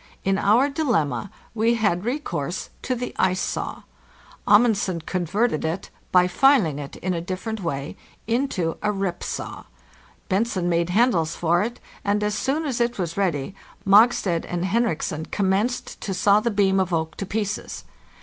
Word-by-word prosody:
In 195 0 +1
our 225 +8 +4
dilemma 235 - 0 0.2
we 230 +1 +2
had 205 -4 0
recourse 230 - -3
to 255 - -1
the 245 +1 -4
ice 185 0 +2
saw. - - -3 0.6
Amund 215 +2 +6
sen 185 -4 -2
converted 185 +3 -1
it 165 +4 -3 0.2
(by 180 -1 +6
filing 185 - +3
it 140 -1 -7
in 185 0 -2
a 170 - -2
different 190 +5 -4
way) 140 -5 -3 0.3
into 225 -8 -1
a 210 - +1
rip 195 -3 -2
saw; - - -5 0.6
Bentzen 190 -2 0
made 170 0 +1
handles 180 -6 +2
for 170 +1 +2
it; 235 +3 -3 0.2
and 205 +1 +1
as 210 0 0
soon 275 +9 -1
as 255 -5 -1
it 235 0 0
was 170 -4 -3
ready, 175 -5 -1 0.3
Mog 210 +5 +7
stad 175 -7 -1
and 175 0 -2
Henriksen 190 -7 -1
commenced 205 +5 -1
to 195 - -3
saw 200 +3 +4
the 235 +2 0
beam 195 -2 +2
of 185 -1 0
oak 160 0 -1
to 195 - -3
pieces. 210 0 -3
195 Hz, 165 wpm, -23 LUFS, 175-230 Hz, 0.6 s, Mog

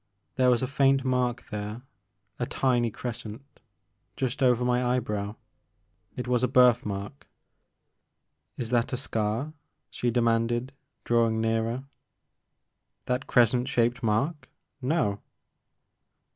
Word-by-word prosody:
There 130 -1 +4
was 125 0 +3
a - - 0
faint 135 0 +2
mark 125 -1 0
there, 105 +3 -5 0.6
a - - -1
tiny 120 -3 +1
crescent, 120 +3 -8 0.6
just 130 -1 -2
over 125 -2 +3
my 125 0 +2
eyebrow. 105 -4 -1 0.8
It 125 -1 -4
was 125 -1 +2
a 125 - +3
birthmark. 120 -2 +2 1.3
*'Is 115 -1 -4
that 120 -1 +1
a - - 0
scar?" 115 +4 -2 0.4
she 125 - -1
demanded 120 +2 +1 0.3
drawing 115 -1 +2
nearer. 115 +3 0 0.6
" - - -51
That 125 +2 -2
crescent 125 +1 +3
shaped 120 -1 +1
mark? 135 +8 -1 0.3
No.' 125 -8 0
120 Hz, 115 wpm, -27 LUFS, 115-125 Hz, 1.3 s, There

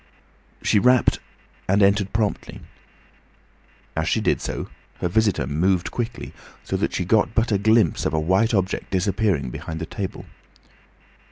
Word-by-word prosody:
She 105 - +3
rapped 125 +2 +3 0.5
and 100 +2 +3
entered 100 0 +2
promptly. 105 -2 -2 1.3
As 80 0 -1
she - - +1
did 105 - 0
so - - -4 0.3
her - - -2
visitor 105 -5 +1
moved 85 +6 0
quickly, 115 -1 -5 0.3
so - - -3
that - - -1
she 90 - -1
got 110 +3 +2
but 115 0 +1
a 100 - +2
glimpse 110 -4 +3
of 80 - -3
a - - +2
white 95 +8 +2
object 95 -1 -1
disappearing 95 - 0
behind 80 +4 -6
the 80 - -4
table. 95 +3 -6
100 Hz, 150 wpm, -23 LUFS, 85-110 Hz, 1.3 s, She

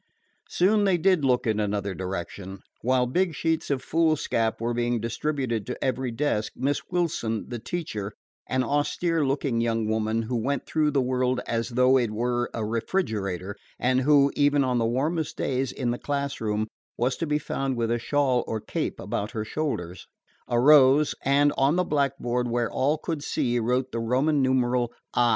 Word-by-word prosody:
Soon 205 +4 +3
they 190 -3 +3
did 185 -2 +3
look 125 -2 +2
in 110 -2 +1
another 100 -1 -1
direction. 95 +1 -6 0.2
While 125 +1 +2
big 170 +6 0
sheets 160 +1 -1
of 135 -2 -1
foolscap 155 -8 +1
were 120 +1 -1
being 120 0 0
distributed 120 -1 -2
to 125 - -5
every 130 -1 -1
desk, 115 -3 -1
Miss 140 +3 0
Wilson, 155 -11 -1
the 120 - -4
teacher 110 - -4 0.3
(an 130 0 +1
austere 155 +4 0
looking 135 -3 0
young 115 -1 0
woman 110 +1 0
who 120 +3 -3
went 140 +5 -1
through 155 -1 +1
the 140 -3 +1
world 125 0 0
as 115 +1 -2
though 125 +2 +4
it 120 -3 0
were 120 +2 -1
a 110 - -3
refrigerator, 105 - -2 0.2
and 130 +1 +2
who, 140 0 +4
even 145 0 +3
on 125 -2 +1
the 115 - +1
warmest 150 +6 -1
days 130 0 -1
in 125 -3 -2
the 120 - -3
classroom, 135 -7 -2 0.3
was 125 +2 +1
to 165 - -2
be 150 0 +1
found 135 -3 -2
with 115 -1 0
a 120 - +1
shawl 130 -1 +1
or 110 - -2
cape - - -3
about 105 - -3
her 110 -1 -3
shoulders), 95 - -4 0.4
arose, 135 +3 +6
and 145 +2 +3
on 135 +4 +3
the 180 - +2
blackboard 135 -6 0
where 120 0 0
all 145 +4 +1
could 155 -1 -4
see 120 -4 0
wrote 125 +3 0
the 115 - -3
Roman 135 +6 +1
numeral 125 -2 +1 0.2
"I." 120 -1 +3
125 Hz, 175 wpm, -26 LUFS, 115-145 Hz, 0.4 s, arose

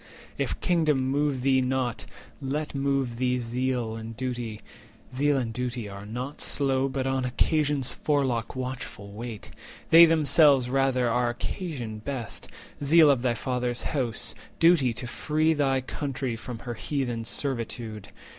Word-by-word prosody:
170 - - +1
If - - -4
kingdom 150 -7 +2
move 145 -2 +1
thee 130 -1 +4
not, 125 -2 -1 0.3
let 150 +3 -3
move 135 -3 0
thee 125 0 +1
zeal 120 -1 -1
And 115 0 -7
duty—zeal 125 +3 -3
and 115 -4 -2
duty 120 -2 -3
are 100 0 -8
not 125 +6 -5
slow, 135 -1 +1
But 130 0 -2
on 135 0 0
Occasion's 145 +1 +1
forelock 130 -7 0
watchful 125 -5 -5
wait: 110 0 -7 0.4
They 165 +1 +10
themselves 145 -4 +4
rather 135 -2 +2
are 120 +1 +2
occasion 120 - -4
best— 120 0 -5 0.4
Zeal 155 +1 +7
of 130 -4 +1
thy 120 -2 +1
Father's 125 0 -2
house, 125 -6 -1 0.3
duty 165 -7 +5
to 120 - -5
free 155 +6 +1
Thy 135 -3 +1
country 130 -2 -3
from 115 +1 -7
her 120 - -3
heathen 120 -1 -2
servitude. 115 -2 -4
130 Hz, 140 wpm, -27 LUFS, 120-140 Hz, 0.4 s, They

